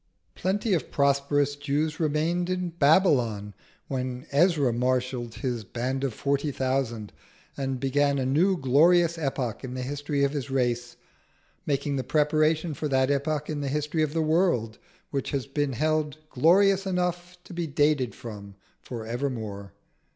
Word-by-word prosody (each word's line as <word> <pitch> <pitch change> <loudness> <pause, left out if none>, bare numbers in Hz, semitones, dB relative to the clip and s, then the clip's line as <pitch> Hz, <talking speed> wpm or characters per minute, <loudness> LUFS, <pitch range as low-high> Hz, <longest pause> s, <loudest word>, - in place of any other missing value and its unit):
Plenty 200 +3 0
of 170 - -1
prosperous 140 0 +2
Jews 145 +2 -1
remained 165 +3 0
in 180 -1 -1
Babylon 140 - +2 0.3
when 130 -1 -4
Ezra 145 -4 +3
marshalled 125 -1 -1
his 125 -5 -3
band 125 +6 -3
of 135 - 0
forty 140 +5 -1
thousand 130 -5 -2 0.4
and 135 -2 -3
began 140 +1 +2
a 130 - -1
new 175 +9 +3
glorious 170 +5 +4
epoch 135 -6 -2
in 130 -1 -5
the 130 - -3
history 145 +1 -2
of 140 - +2
his 140 -2 -4
race, 120 -2 -1 0.7
making 140 0 0
the 130 - -1
preparation 155 +2 +2
for 150 +2 -3
that 130 -1 +2
epoch 145 +1 -1
in 150 -2 -3
the 140 - -2
history 150 +3 -1
of 150 -1 0
the 160 - +2
world 155 -9 +1 0.3
which 140 -2 -2
has 140 -3 -2
been 140 0 -1
held 155 +2 0
glorious 195 +7 +4
enough 180 -1 -2
to - - -11
be 170 -1 -2
dated 145 -3 +1
from 100 -4 -9 0.3
for 115 -3 -7
evermore. 110 -5 -4
140 Hz, 150 wpm, -26 LUFS, 130-155 Hz, 0.7 s, glorious